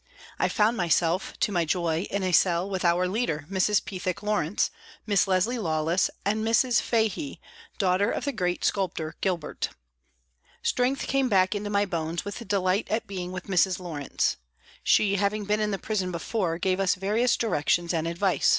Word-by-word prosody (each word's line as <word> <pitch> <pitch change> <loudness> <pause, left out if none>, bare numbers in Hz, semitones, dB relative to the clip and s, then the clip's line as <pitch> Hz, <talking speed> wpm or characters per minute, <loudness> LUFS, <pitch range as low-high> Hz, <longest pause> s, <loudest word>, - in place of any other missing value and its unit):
I - - +2
found 220 +2 +2
myself, 175 -1 +1
to - - +2
my 175 -3 +2
joy, 165 +1 0
in 200 -1 -2
a 185 - 0
cell 175 +1 +3
with 190 -2 -3
our 175 +1 +3
leader, 180 -7 -1
Mrs. 195 +1 +2
Pethick 185 0 -4
Lawrence, 205 -4 0 0.3
Miss 205 -2 +2
Leslie 195 +6 +1
Lawless 160 -1 +1 0.2
and 215 +2 0
Mrs. 230 +2 +3
Fahey, 230 +6 -1 0.4
daughter 195 +1 +2
of - - -2
the 285 - 0
great 180 -7 -1
sculptor 165 -5 -1
Gilbert. 180 -5 -2 0.9
Strength 255 +2 +1
came 270 -1 +1
back 190 -2 +3
into 205 0 -3
my 205 0 +2
bones 165 -3 -3
with 205 +3 -6
delight 195 0 +1
at 220 +2 -1
being 180 -2 -5
with 185 0 -5
Mrs. 190 -1 +2
Lawrence. 155 -6 -2 0.4
She 200 -1 +3
having 205 +1 0
been 210 +1 +1
in 210 -1 0
the 200 - -1
prison 190 -3 -2
before 170 0 -2
gave 185 +1 0
us 195 -2 +2
various 210 +6 +1
directions 170 -4 +1
and 165 -1 0
advice. 180 +3 +1
190 Hz, 170 wpm, -26 LUFS, 175-210 Hz, 0.9 s, cell